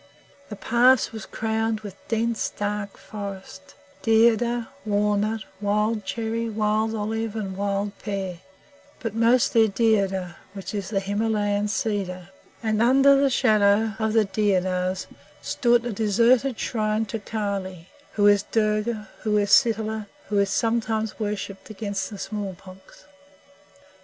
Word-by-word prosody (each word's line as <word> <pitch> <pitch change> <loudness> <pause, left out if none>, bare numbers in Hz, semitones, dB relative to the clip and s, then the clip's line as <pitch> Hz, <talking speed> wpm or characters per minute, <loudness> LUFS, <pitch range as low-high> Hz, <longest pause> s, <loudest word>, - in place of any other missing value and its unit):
The 210 - -6
pass 240 +4 +3
was 220 -3 -8
crowned 220 0 -1
with 205 -3 -8
dense, 230 0 0
dark 205 -1 -4
forest 205 +7 -9 0.3
deodar, 230 +1 +3
walnut, 210 +1 0 0.2
wild 210 +1 0
cherry, 230 +3 -2
wild 215 +1 0
olive, 220 +1 -3
and 195 -4 -4
wild 200 +1 -2
pear, 190 -4 -4 0.6
but 225 -3 -4
mostly 230 0 +4
deodar, 195 -4 +1 0.2
which 195 -1 -7
is 200 -2 -3
the 195 -3 0
Himalayan 205 0 0
cedar; 195 -4 -2 0.3
and 220 -1 +1
under 270 +3 +6
the 275 0 +3
shadow 215 -3 +3
of 220 -1 0
the 220 -1 +4
deodars 185 -2 0 0.4
stood 240 -2 +2
a 240 - -2
deserted 230 +4 +2
shrine 215 -1 0
to 220 +2 -4
Kali 200 -5 -4 0.2
who 205 - +2
is 205 -1 +6
Durga, 215 +1 -1
who 210 -1 +1
is 205 0 +1
Sitala, 220 -2 +3 0.2
who 205 -1 +2
is 200 -1 +2
sometimes 225 -1 -1
worshipped 205 -2 -4
against 200 -2 -4
the 205 - -8
smallpox. 190 -2 -8
215 Hz, 125 wpm, -24 LUFS, 200-225 Hz, 0.6 s, under